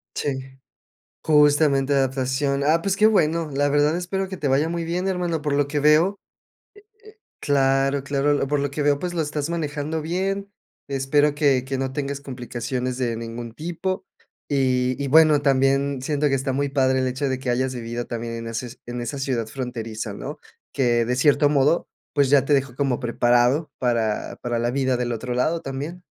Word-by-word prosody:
Sí. 140 -2 -1 0.9
Justamente 145 -2 +4
adaptación. 135 +1 0
Ah, 160 +3 +3
pues 195 +2 0
qué 215 +2 +5
bueno. 165 -6 +2
La 145 +1 +1
verdad 145 +2 +2
espero 190 +2 -2
que 190 - -6
te 145 - -2
vaya 140 +4 +2
muy 170 0 -2
bien, 175 +3 -2
hermano. 175 -4 -1
Por 145 -1 -1
lo 140 0 +2
que 145 +1 -1
veo, 150 +5 +5
eh - - -8
eh - - -73 1.0
claro, 135 -1 +2
claro, 140 +1 +1
lo 140 - 0
por 145 0 0
lo 140 -1 -1
que 145 +1 -3
veo, 145 -1 +2
pues 180 +1 -4
lo 165 - +1
estás 150 +1 -3
manejando 155 -1 -3
bien. 195 +4 -2 0.4
Espero 140 +2 +2
que 140 -4 +2
que 135 0 -3
no 130 0 -2
tengas 140 0 -3
complicaciones 125 -1 -4
de 120 -3 -1
ningún 115 0 -6
tipo. 175 +6 -4 0.4
Y 130 -1 +1
y 140 - -2
bueno, 155 0 +5
también 135 0 +2
siento 145 +2 0
que 135 - +1
está 135 +1 -2
muy 140 +2 0
padre 130 -1 +2
el 130 - +1
hecho 135 +3 -2
de 130 -1 -1
que 130 - -2
hayas 130 +1 0
vivido 120 0 -5
también 115 -1 -5
en 115 0 -6
eses 115 +2 -5
en 120 0 -5
esa 120 +4 -4
ciudad 130 -5 -1
fronteriza, 115 -4 -5
¿no? - - -7 0.3
Que, 120 -3 +2
de 125 +2 -1
cierto 145 +2 +4
modo, 145 +3 +2 0.2
pues 140 -2 +2
ya 140 -2 +5
te 145 - +2
dejó 135 -3 0
como 135 -3 0
preparado 120 +4 +2
para 115 -4 -1
para 120 -1 -1
la 120 +1 0
vida 130 -1 +1
del 120 0 -2
otro 120 +2 -4
lado 160 +7 +1
también. 145 +7 -6
140 Hz, 195 wpm, -23 LUFS, 125-150 Hz, 1.0 s, qué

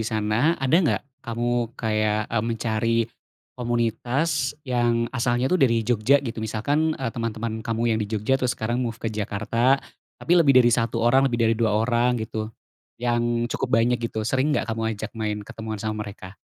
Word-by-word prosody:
sana, 110 +8 +1
ada 135 +1 -2
nggak, 130 - +1 0.2
kamu 120 -1 -2
kayak, 110 -1 0
e - - 0
mencari, 115 0 0 0.6
komunitas 125 +5 0 0.2
yang 120 -2 +1
asalnya 120 +1 +1
tuh 185 +4 +1
dari 115 -4 +3
Jogja 120 +4 +3
gitu? 115 -2 -4
Misalkan, 145 +9 0
eee, 130 -3 -3
teman-teman 115 -1 -3
kamu 115 +1 0
yang 110 - 0
di 105 - -2
Jogja 110 +4 0
terus 125 -1 0
sekarang 120 +3 -1
move 115 -3 -2
ke - - -5
Jakarta. 115 +5 +1 0.4
Tapi 170 - -1
lebih 140 -5 +5
dari 120 -1 +5
1 115 0 +1
orang, 135 +3 +4
lebih 120 - -2
dari 115 0 +3
2 110 -1 +1
orang 120 +2 +2
gitu. 110 0 -4 0.5
Yang 120 0 0
cukup - - -2
banyak 120 +2 +2
gitu. 110 -2 -3
Sering 135 +6 +1
nggak - - -1
kamu 110 -1 -2
ajak - - -6
main 105 -2 -2
ketemuan 110 +1 -6
sama 110 0 -3
mereka? 100 -2 -10
115 Hz, 175 wpm, -24 LUFS, 110-125 Hz, 0.6 s, lebih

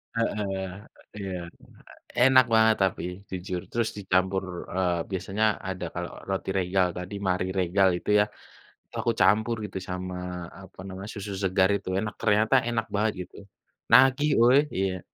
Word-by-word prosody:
Heeh, 100 -4 -2 0.5
iya. 100 -2 -5 0.9
Enak 130 0 +7
banget 110 0 +5
tapi, 95 -3 0 0.3
jujur. 90 -1 -4
Terus 115 -1 0
dicampur, 95 -1 0 0.3
eee, 90 -2 +1
biasanya 95 +3 -1 0.2
ada 95 -1 -4
kalau 90 0 -4 0.2
roti 95 0 -2
Regal 90 0 +2
tadi, 90 +3 -6
Marie 95 0 0
Regal 95 +2 +3
itu - - -5
ya, - - +5 0.6
itu - - -27
aku 115 - +2
campur 110 +5 +3
gitu 105 - -5
sama, 90 0 -4 0.5
apa 95 - -16
namanya, 95 +1 -7
susu 100 -1 -6
segar 95 0 +3
itu, 100 - -7
enak, 105 +1 -3
ternyata 110 +4 +3
enak 115 -1 -1
banget 105 +2 +2
gitu. - - -14 0.5
Nagih 135 +3 +6
woy, 125 +3 +6 0.2
iya. 95 -1 -1
95 Hz, 145 wpm, -26 LUFS, 95-110 Hz, 0.9 s, Enak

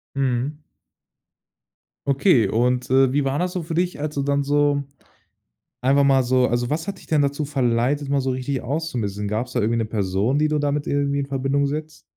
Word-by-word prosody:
Mhm. 135 +2 -1 1.5
Okay, 135 - +4
und, 125 +3 0
äh, 130 0 +4
wie 145 0 +1
war 135 +1 0
das 180 +2 -1
so 180 -2 -3
für 165 +1 -5
dich, 175 -1 -1
als 150 0 -4
du 140 - 0
dann 140 0 +1
so 145 0 +2 1.0
einfach 135 +3 +3
mal 135 -2 +4
so 125 0 +2
also 120 0 0
was 160 +5 -2
hat 195 -2 -4
dich - - -16
denn 150 -2 +2
dazu 140 +2 -1
verleitet, 135 +1 0
mal 140 -1 +1
so 130 - -1
richtig 130 +1 -2
auszumisten? 120 -9 -3
Gab's 115 +4 -3
da 120 - 0
irgendwie 115 +3 +1
'ne 115 - 0
Person, 105 +5 0
die 155 - +3
du 150 0 0
damit 145 0 -1
irgendwie 140 0 0
in 140 - -3
Verbindung 135 +1 0
setzt? 155 +2 -6
140 Hz, 195 wpm, -22 LUFS, 125-145 Hz, 1.5 s, Okay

